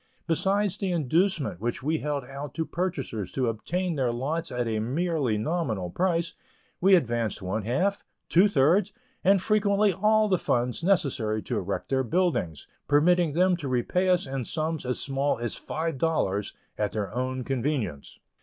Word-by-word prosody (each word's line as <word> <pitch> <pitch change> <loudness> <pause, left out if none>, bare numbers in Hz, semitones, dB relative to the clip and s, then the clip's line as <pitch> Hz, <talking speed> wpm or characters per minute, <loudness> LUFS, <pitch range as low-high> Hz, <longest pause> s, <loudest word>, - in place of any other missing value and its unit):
Besides 195 +4 +1
the 195 -3 -1
inducement 165 - 0
which 120 +2 -2
we 155 +2 0
held 145 -2 -2
out 135 +1 -8
to 160 - -1
purchasers 140 - -3
to 130 -2 0
obtain 175 +11 -2
their 130 -4 +1
lots 140 +7 -2
at 125 -1 -1
a 110 -1 -1
merely 140 -1 0
nominal 110 - -2
price, 170 - 0 0.5
we 190 +1 +6
advanced 120 - 0
one 100 +3 -2
half, 185 - 0 0.2
two 185 +5 +5
thirds, 180 +4 +3 0.3
and 195 +1 +5
frequently 205 0 +2
all 215 +3 +3
the 185 -3 +2
funds 125 +5 0
necessary 130 - +1
to - - -2
erect 95 +2 -4
their 130 -1 +1
buildings, 130 - 0 0.2
permitting 165 +2 +3
them 180 +3 +3
to 150 -5 -5
repay 130 +9 +1
us 180 -1 +3
in 135 -1 -3
sums 155 -2 -2
as 125 - -1
small 135 +1 0
as 120 -1 -3
five 160 -3 -3
dollars, 105 -11 0 0.2
at 105 -1 0
their 105 -2 -3
own 130 +1 -2
convenience. 125 - -2
145 Hz, 165 wpm, -27 LUFS, 120-180 Hz, 0.5 s, we